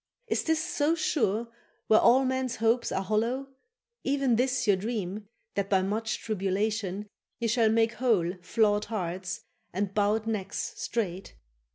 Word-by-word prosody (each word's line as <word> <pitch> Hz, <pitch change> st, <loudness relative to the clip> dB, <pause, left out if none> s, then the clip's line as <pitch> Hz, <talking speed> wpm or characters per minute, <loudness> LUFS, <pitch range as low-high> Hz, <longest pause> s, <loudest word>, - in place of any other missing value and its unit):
Is -, -, 0 dB
this 320 Hz, -1 st, +1 dB
so 300 Hz, +3 st, +1 dB
sure 230 Hz, -, 0 dB, 0.4 s
where 220 Hz, -, +6 dB
all 265 Hz, +2 st, +5 dB
men's 260 Hz, -1 st, -1 dB
hopes 230 Hz, +2 st, +1 dB
are 190 Hz, -, -1 dB
hollow, 230 Hz, +7 st, 0 dB, 0.5 s
Even 275 Hz, -3 st, +2 dB
this 250 Hz, +1 st, +1 dB
your 205 Hz, -3 st, +5 dB
dream, 205 Hz, -1 st, -4 dB, 0.3 s
that 200 Hz, -1 st, -1 dB
by 190 Hz, -2 st, +3 dB
much 215 Hz, +3 st, -1 dB
tribulation 205 Hz, -1 st, -1 dB, 0.3 s
Ye 235 Hz, -, -1 dB
shall 230 Hz, -1 st, +3 dB
make 225 Hz, +1 st, +3 dB
whole 215 Hz, -9 st, +2 dB
flawed 210 Hz, +2 st, +2 dB
hearts, 180 Hz, -3 st, -3 dB, 0.3 s
and 195 Hz, +1 st, -2 dB
bowed 210 Hz, +2 st, +2 dB
necks 205 Hz, -3 st, -3 dB
straight? 195 Hz, -5 st, -3 dB
220 Hz, 145 wpm, -28 LUFS, 195-240 Hz, 0.5 s, where